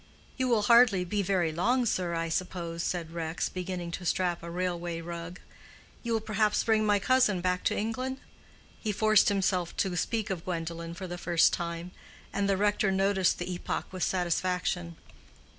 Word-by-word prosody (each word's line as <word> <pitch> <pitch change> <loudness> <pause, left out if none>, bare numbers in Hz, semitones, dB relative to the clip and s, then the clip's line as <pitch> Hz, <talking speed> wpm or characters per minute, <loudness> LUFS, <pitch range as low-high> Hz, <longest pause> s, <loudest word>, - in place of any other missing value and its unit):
"You 260 -1 0
will 230 -4 +2
hardly 225 -4 +5
be 205 +3 -1
very 180 -4 +1
long, 245 +10 +1
sir, 180 -5 0
I 165 0 -1
suppose," 170 -1 -3
said 170 -2 -2
Rex, 165 -1 -2
beginning 180 -2 -4
to 180 - -5
strap 175 -1 0
a 170 - -7
railway 175 -1 -2
rug. 170 +1 -7 0.6
"You 235 -1 -2
will 225 - +2
perhaps 215 -1 +1
bring 220 -1 +2
my 205 -1 +4
cousin 215 -2 +3
back 180 0 0
to - - +1
England?" 255 +5 -2 0.6
He 215 - -1
forced 215 0 +4
himself 185 -3 0
to 190 -2 0
speak 220 +3 -1
of 175 -3 -3
Gwendolen 170 -1 -4
for 190 - -6
the 175 -1 -6
first 175 -2 +3
time, 170 +1 -4 0.4
and 200 0 0
the 195 - +2
rector 205 0 +2
noticed 190 -1 +2
the 180 +1 -4
epoch 175 - -4
with 185 - -6
satisfaction. 180 -1 0
185 Hz, 175 wpm, -29 LUFS, 170-210 Hz, 0.6 s, hardly